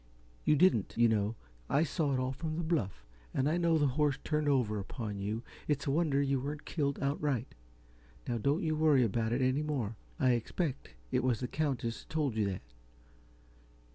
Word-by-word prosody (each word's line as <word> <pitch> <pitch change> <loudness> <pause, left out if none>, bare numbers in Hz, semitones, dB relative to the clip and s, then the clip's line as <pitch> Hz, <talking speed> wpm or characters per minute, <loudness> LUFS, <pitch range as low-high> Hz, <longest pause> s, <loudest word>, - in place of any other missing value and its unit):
You 150 - +5
didn't, 150 - +3
you 120 0 +6
know. 110 0 +1 0.3
I 150 - +3
saw 155 -2 0
it - - 0
all 130 0 0
from 155 +3 -4
the 170 - -1
bluff, 110 - -1 0.3
and 130 - +2
I 160 +3 +2
know 170 -2 +3
the 145 - +3
horse 145 +1 +2
turned 150 -1 +1
over 115 -7 +2
upon 105 0 -5
you. 105 +4 -2 0.2
It's 145 -2 0
a 140 - +1
wonder 150 -2 +2
you 140 -1 +2
weren't 145 +3 -5
killed 140 -4 -1
outright. 140 -3 -1 0.7
Now, 120 -1 -1
don't 145 +8 +1
worry 150 -5 +5
about 110 +1 0
it 125 +2 +1
any 130 +3 +2
more 130 -8 -2 0.2
I 130 -4 +4
expect 130 +5 -2 0.2
it 125 -1 +1
was 125 -4 +2
the 125 - -2
Countess 130 -6 -2
told 150 -6 0
you 110 -2 +2
that. 95 - -5
135 Hz, 185 wpm, -32 LUFS, 115-150 Hz, 0.7 s, you